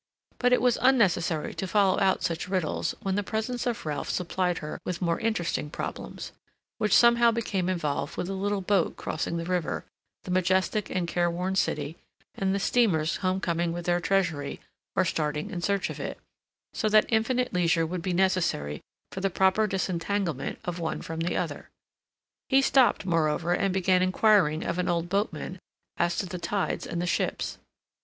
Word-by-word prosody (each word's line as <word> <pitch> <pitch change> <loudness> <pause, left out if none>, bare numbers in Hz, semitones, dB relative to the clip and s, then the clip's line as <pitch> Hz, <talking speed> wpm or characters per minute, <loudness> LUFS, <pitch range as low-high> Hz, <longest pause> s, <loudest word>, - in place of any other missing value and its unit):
But 250 0 +3
it 250 - +3
was 245 -2 +3
unnecessary 180 -11 +2
to 190 - -4
follow 195 -1 +3
out 190 -1 +2
such 170 -1 -2
riddles 185 -5 -1
when 195 -2 0
the 205 - +1
presence 220 +4 -2
of 235 -7 -2
Ralph 150 -1 -3
supplied 180 0 -1
her 150 - -6
with 180 -2 -3
more 170 -2 0
interesting 205 -9 -1
problems, - - -6 0.5
which 210 -2 +3
somehow 235 0 +6
became 205 -6 -1
involved 155 -4 -2
with - - -1
the 195 - -4
little 200 +1 -1
boat 190 -2 +1
crossing 165 +1 -3
the 165 - -3
river, 180 -2 -2 0.4
the 180 - -6
majestic 185 +3 +1
and 180 -2 -1
careworn 175 +2 0
City, 165 -4 -1 0.4
and 195 0 0
the - - 0
steamers 180 -9 +2
homecoming 175 -3 0
with 175 0 -5
their 175 0 +2
treasury, 170 -8 0 0.4
or 190 - +3
starting 150 -3 -2
in 175 - -4
search 200 +2 0
of - - -8
it, - - -4 0.6
so 215 - 0
that 215 0 +5
infinite 245 +3 +1
leisure 170 -2 +2
would 175 +2 -4
be 185 +2 -2
necessary 175 - +1 0.3
for 190 - -5
the 195 - +1
proper 190 +4 +3
disentanglement 190 -1 -2
of 175 0 -3
one 165 -1 -3
from 165 0 -5
the 170 +2 -1
other. - - -4 0.8
He 270 0 +5
stopped, 265 -7 +4
moreover, 165 0 +1
and 195 +2 +1
began 185 -1 +2
inquiring 185 -4 +3
of 170 +1 -2
an 180 - 0
old 170 0 0
boatman 195 -1 -2 0.4
as 170 0 +1
to - - -1
the 180 0 -6
tides 195 +2 -2
and 170 - -3
the 175 - -1
ships. 175 - -1
185 Hz, 175 wpm, -27 LUFS, 170-200 Hz, 0.8 s, somehow